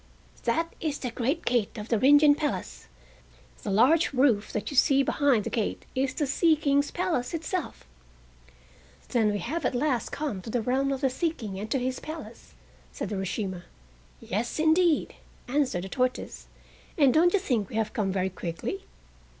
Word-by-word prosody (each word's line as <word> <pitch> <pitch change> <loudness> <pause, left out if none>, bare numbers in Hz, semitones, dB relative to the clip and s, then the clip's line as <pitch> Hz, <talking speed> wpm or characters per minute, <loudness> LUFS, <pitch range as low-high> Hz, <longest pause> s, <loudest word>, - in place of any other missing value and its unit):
"That 330 +8 0
is 300 -3 -1
the 250 - -4
great 250 +6 -1
gate 235 -4 0
of 210 +1 -7
the 230 - +2
Rin 285 +5 +7
Gin 295 0 +6
Palace, 290 - -4 0.7
the - - -5
large 275 +12 +4
roof 250 -6 +2
that 210 +3 -3
you - - -5
see 275 +1 +5
behind 270 -6 +2
the - - -4
gate 220 -3 -2
is 260 0 -1
the 300 - 0
Sea 315 +4 +3
King's 285 -1 +1
Palace 335 -4 -1
itself." 335 +3 -4 1.2
"Then 220 -4 +2
we 205 - -1
have 295 - -3
at 250 - 0
last 250 -3 0
come 280 -11 -3
to 225 - -9
the 230 0 -1
realm 270 +3 +1
of 270 0 -2
the 270 -2 +2
Sea 330 +6 0
King 215 - -7
and 215 +2 -5
to 270 - +1
his 255 0 -2
Palace," 315 +1 -9 0.4
said - - -5
Urashima. 190 -2 -3 0.5
"Yes, 220 +5 -3
indeed," 320 +1 +3 0.3
answered 255 -9 0
the 190 - -6
tortoise, 255 +1 -2 0.5
"and 280 -5 +5
don't 350 +3 +4
you 405 - +4
think 240 - -1
we - - -8
have 220 -1 -1
come 210 -6 0
very 190 0 -1
quickly?" 175 +2 -5
255 Hz, 180 wpm, -27 LUFS, 215-295 Hz, 1.2 s, Rin